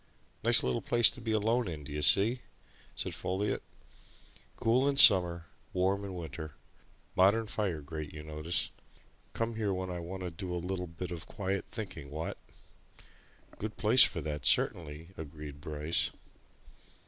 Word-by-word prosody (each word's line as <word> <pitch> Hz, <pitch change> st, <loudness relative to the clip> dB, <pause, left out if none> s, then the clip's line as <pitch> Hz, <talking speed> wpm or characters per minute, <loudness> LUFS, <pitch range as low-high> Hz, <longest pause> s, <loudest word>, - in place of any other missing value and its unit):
"Nice -, -, +8 dB
little 65 Hz, -1 st, -1 dB
place 120 Hz, -2 st, +4 dB
to 125 Hz, -, -11 dB
be 115 Hz, -1 st, -3 dB
alone 110 Hz, +2 st, +1 dB
in, 80 Hz, -4 st, -6 dB
d'ye 75 Hz, +1 st, -5 dB
see?" 105 Hz, -, +4 dB, 0.6 s
said -, -, -1 dB
Folliot. 95 Hz, +3 st, -2 dB, 0.9 s
"Cool 125 Hz, +5 st, +2 dB
in 140 Hz, -, 0 dB
summer 90 Hz, -10 st, +7 dB, 0.3 s
warm 95 Hz, +2 st, +1 dB
in 95 Hz, -2 st, -6 dB
winter 80 Hz, -2 st, -7 dB, 0.6 s
modern 100 Hz, +5 st, +4 dB
fire 100 Hz, -7 st, -2 dB
grate, 75 Hz, +1 st, -7 dB
you 75 Hz, 0 st, -9 dB
notice. 75 Hz, +2 st, -2 dB, 0.6 s
Come 115 Hz, 0 st, -2 dB
here 105 Hz, -3 st, 0 dB
when 95 Hz, -1 st, -3 dB
I 90 Hz, -, -4 dB
want 90 Hz, +3 st, -7 dB
to 90 Hz, -1 st, -4 dB
do 90 Hz, +2 st, -5 dB
a 90 Hz, +1 st, -3 dB
bit 85 Hz, +2 st, -7 dB
of 85 Hz, -2 st, -7 dB
quiet 95 Hz, -1 st, -3 dB
thinking, 90 Hz, -, -7 dB
what?" 80 Hz, +3 st, -5 dB, 1.2 s
"Good 105 Hz, +1 st, -5 dB
place 115 Hz, +4 st, +7 dB
for 85 Hz, -, +1 dB
that 75 Hz, -2 st, -5 dB
certainly," 80 Hz, +2 st, +2 dB
agreed 75 Hz, -2 st, -9 dB
Bryce. 75 Hz, +2 st, 0 dB
90 Hz, 150 wpm, -31 LUFS, 80-105 Hz, 1.2 s, Nice